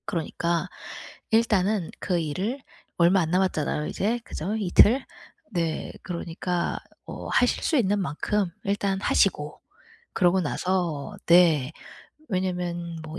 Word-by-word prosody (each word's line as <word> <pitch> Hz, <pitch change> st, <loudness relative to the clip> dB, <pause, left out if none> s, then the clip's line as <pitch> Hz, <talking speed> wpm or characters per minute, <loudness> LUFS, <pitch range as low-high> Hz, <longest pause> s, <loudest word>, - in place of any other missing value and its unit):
그러니까 170 Hz, -1 st, -1 dB, 0.6 s
일단은 210 Hz, -4 st, +2 dB
그 180 Hz, -2 st, 0 dB
일을 185 Hz, -, -2 dB, 0.4 s
얼마 180 Hz, +2 st, +5 dB
안 160 Hz, -1 st, -2 dB
남았잖아요 175 Hz, -5 st, 0 dB
이제. 225 Hz, +5 st, -1 dB
그죠? 190 Hz, +8 st, -4 dB
이틀? 215 Hz, +6 st, +5 dB, 0.5 s
네. 165 Hz, -4 st, -2 dB
그러니까 175 Hz, 0 st, -3 dB, 0.3 s
어 -, -, -7 dB
하실 -, -, +2 dB
수 315 Hz, -, +2 dB
있는 205 Hz, -4 st, +2 dB
만큼 190 Hz, +4 st, -1 dB
일단 200 Hz, -1 st, 0 dB
하시고 150 Hz, -8 st, +1 dB, 0.5 s
그러고 180 Hz, +1 st, +3 dB
나서 170 Hz, -3 st, -2 dB
네 165 Hz, -5 st, +5 dB, 0.6 s
왜냐하면 175 Hz, -3 st, -2 dB
뭐 160 Hz, +2 st, -7 dB
180 Hz, 240 characters per minute, -26 LUFS, 165-195 Hz, 0.6 s, 얼마